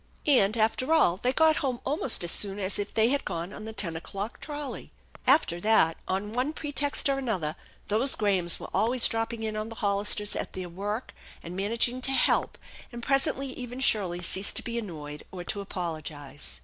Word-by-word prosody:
And, 235 -7 +5
after 225 +6 +1
all, 180 - +4
they 245 +5 +1
got 320 +3 +4
home 255 -4 -1
almost 270 - -2
as 170 - +3
soon 200 -1 0
as 195 0 0
if 205 - -3
they 225 +1 +3
had 280 +1 +1
gone 170 +4 -4
on 215 - -8
the 220 - -5
ten 190 -6 +2
o'clock 200 +6 -5
trolley. 295 -2 -6 0.4
After 260 - +4
that 175 -5 +4
on 195 +3 -1
one 255 +6 0
pretext 290 -2 0
or 275 -1 +1
another 185 - -2 0.3
those 230 +6 +2
Grahams 190 -5 +2
were - - -8
always 235 +2 +4
dropping 225 0 -2
in 215 -1 -2
on 215 +1 -3
the 225 - -8
Hollisters 205 0 0
at - - -4
their 185 -1 -5
work 205 +7 -4 0.3
and 175 +2 -7
man 200 +3 -1
aging 240 +2 +2
to 270 - +1
"help," - - +2 0.3
and 240 -1 -7
presently 275 0 +2
even 250 -1 -7
Shirley 185 -9 +1
ceased 190 +3 0
to - - -3
be 235 -1 -3
annoyed 150 -8 -7
or 180 -2 -6
to 200 +3 -2
apologize. 155 -7 -5
215 Hz, 195 wpm, -28 LUFS, 185-255 Hz, 0.4 s, And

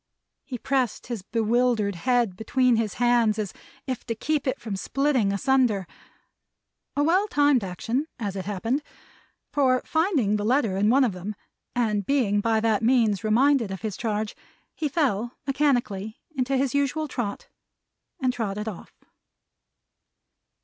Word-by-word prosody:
He 255 - -6
pressed 255 -4 -1
his 235 -4 -4
bewildered 225 0 +1
head 235 +1 +1
between 250 +4 +2
his 220 -3 -1
hands 240 -3 +3
as 210 -3 -3 0.3
if 255 -3 -4
to 230 - -2
keep 290 +4 -1
it 260 - -1
from 215 -4 -4
splitting 255 0 +1
asunder. 225 -2 +2 1.1
A 290 - +2
well 370 +7 +3
timed 285 - +3
action, 225 - -2
as 205 -5 -4
it 190 -2 -4
happened; 225 +8 -1 0.7
for 255 -3 +2
finding 315 - +1
the 205 - -3
letter 225 -3 +2
in 205 +2 +2
one 270 +4 +5
of 245 - +2
them, 185 +3 -6 0.4
and 215 -4 +1
being 205 -4 +2
by 225 0 +2
that 220 -2 +2
means 225 -4 +3
reminded 240 +1 +3
of 190 -1 -6
his 215 -4 -3
charge, 215 -2 -2 0.4
he 305 -2 -2
fell, 245 - 0
mechanically, 245 -7 0 0.2
into 265 +1 0
his 270 0 0
usual 285 +2 0
trot, 230 -7 -4 0.7
and 255 -2 +1
trotted 210 -3 -3
off. 210 -5 -7
235 Hz, 145 wpm, -25 LUFS, 210-265 Hz, 1.1 s, one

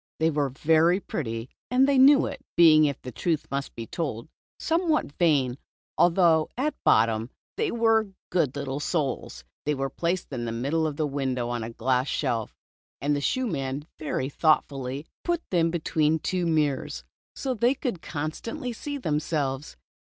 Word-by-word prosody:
They 160 +1 +3
were 145 -2 0
very 160 +6 +3
pretty 115 - -4 0.2
and 255 +2 +4
they 275 -2 +4
knew 275 +2 +7
it, - - -6
being, 155 -2 +7
if 140 -2 -1
the 125 - -6
truth 155 +6 -1
must 140 0 -3
be 115 - -5
told, 155 - -4 0.3
somewhat 325 - +1
vain, 140 -6 +2 0.4
although 170 -3 +4
at 295 +4 0
bottom, 115 +1 +3 0.3
they 440 0 0
were 225 -2 +3 0.2
good 155 -7 +1
little 140 -1 -3
soles. 140 - -2 0.2
They 150 0 0
were 135 0 -2
placed 170 0 -2
in 120 -2 -3
the 115 - -3
middle 140 +8 0
of 150 - -4
the 155 - +1
window 130 -4 -2
on 120 -1 -2
a 115 - -5
glass 125 +3 0
shelf, 115 -4 -2 0.4
and 145 +1 +1
the 145 - -2
shoe 255 - 0
man 140 - -3
very 145 -3 -2
thoughtfully 140 -2 0 0.2
put 345 -1 -1
them 170 -2 +3
between 160 -2 +1
two 180 +2 -1
mirrors, 150 -4 0 0.3
so 265 -2 -2
they 245 +3 +2
could 245 - -3
con 155 +1 -3
stantly 230 +6 -6
see 285 +4 -5
themselves. 150 - -2
155 Hz, 165 wpm, -26 LUFS, 135-180 Hz, 0.4 s, knew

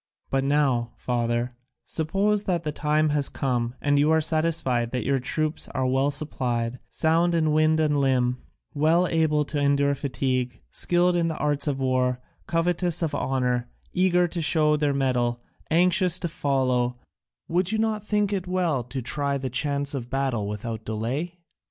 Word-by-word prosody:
"But 135 0 +1
now, 135 -5 +1
father, 120 0 -1 0.3
suppose 200 +6 0
the 180 -2 +1
time 150 0 +1
has 145 -1 +1
come, 125 -2 -2
and 145 -1 +2
you 150 +2 +3
are 160 0 +4
satisfied 155 -7 +1
that 125 -2 -3
your 135 0 +1
troops 155 +5 -2
are 130 - 0
well 135 +2 +2
supplied, 125 -5 -1
sound 170 +2 +2
in 155 -2 +2
wind 155 +1 +3
and 150 -2 +2
limb, 125 -2 +1 0.3
well 160 +4 +3
able 155 -3 +1
to 145 0 -3
endure 140 0 +2
fatigue, 130 -3 -2
skilled 175 0 +2
in 170 -1 +1
the 160 - -3
arts 145 0 0
of 140 -2 -1
war, 130 -1 +1 0.3
covetous 175 0 +1
of 160 -2 -1
honour, 125 -3 -1 0.2
eager 180 -1 +3
to 170 0 -4
show 155 -1 +3
their 150 -1 +1
mettle, 125 -3 0 0.3
anxious 180 +2 +3
to 185 - -2
follow, 130 -5 0 0.5
would 180 +3 0
you 220 - 0
not 220 -2 0
think 210 -1 0
it 185 -2 -2
well 180 -7 0
to 125 +2 -6
try 140 +2 -1
the 130 -2 -4
chance 140 +2 0
of 125 -3 -5
battle 130 -6 -1
without 110 +2 -5
delay?" 125 +12 -3
145 Hz, 165 wpm, -25 LUFS, 125-165 Hz, 0.5 s, are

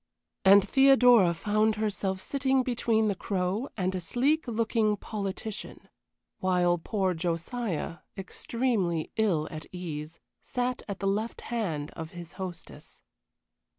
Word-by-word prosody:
And 195 +1 +7
Theodora 250 -7 +6
found 215 +4 +1
herself 205 -3 -1
sitting 265 +2 +1
between 230 -3 +1
the 205 - +2
Crow 195 +6 -2
and 185 -1 0
a 185 - -2
sleek 270 - +1
looking 225 -2 +1
politician; 205 +1 -6 0.5
while 180 -2 +2
poor 190 +1 0
Josiah, 170 +2 -3 0.2
extremely 195 -4 -1
ill 180 -9 +2
at 155 -1 -7
ease, 165 -3 -6 0.2
sat 250 0 -2
at 200 -1 -5
the 195 - 0
left 215 +4 -1
hand 170 -11 -3
of 160 +1 -8
his 175 -1 -9
hostess. 180 -2 -8
200 Hz, 120 wpm, -28 LUFS, 175-230 Hz, 0.5 s, And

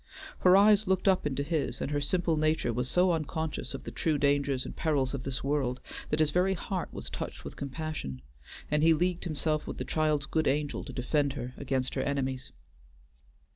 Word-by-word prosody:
Her 185 +1 +7
eyes 210 +1 +6
looked 190 +1 +1
up 185 -5 +4
into 140 0 -1
his, 155 0 -1
and - - -3
her 145 0 0
simple 170 +2 +1
nature 155 -6 +1
was 125 +2 -1
so 180 0 +4
unconscious 160 -3 -2
of 135 - -7
the - - -6
true 155 -2 0
dangers 140 -2 +1
and - - -7
perils 145 -5 +1
of 140 - -3
this 130 -1 -4
world, 135 -3 0 0.3
that 150 - 0
his 155 -1 +3
very 185 +4 +2
heart 185 +1 -4
was - - -7
touched - - -6
with - - -7
compassion, 140 - -5 0.5
and 150 0 +3
he 165 +1 +6
leagued 180 +2 0
himself 155 -1 -1
with - - -5
the - - -3
child's 155 -3 +1
good 155 +1 0
angel 145 +1 0
to - - -7
defend 140 +2 0
her 125 -3 -5
against 130 -2 -2
her 135 - -1
enemies. 130 -2 -2
150 Hz, 200 wpm, -30 LUFS, 135-165 Hz, 0.5 s, Her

